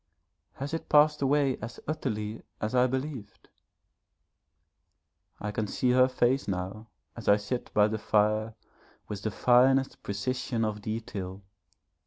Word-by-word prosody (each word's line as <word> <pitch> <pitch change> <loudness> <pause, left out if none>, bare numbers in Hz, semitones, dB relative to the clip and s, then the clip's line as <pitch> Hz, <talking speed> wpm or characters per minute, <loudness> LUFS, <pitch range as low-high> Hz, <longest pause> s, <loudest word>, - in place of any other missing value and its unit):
Has 140 +3 -6
it 165 - -4
passed 150 0 +5
away 140 -1 +2
as 115 +2 -7
utterly 110 -8 -3 0.2
as 105 +2 -2
I 125 0 +4
believed? 130 -4 -5 1.9
I 105 - -3
can 105 0 -2
see 125 +4 +1
her 130 +1 +5
face 130 0 +1
now 95 +3 -4 0.3
as - - -9
I 100 - +7
sit 105 +4 -4
by 105 0 +6
the 110 0 -3
fire 110 +1 +1 0.5
with 105 -2 -5
the 110 - -1
finest 130 +4 +3
precision 115 +3 -2
of 105 -1 -3
detail. 100 -3 -5
110 Hz, 135 wpm, -29 LUFS, 105-130 Hz, 1.9 s, I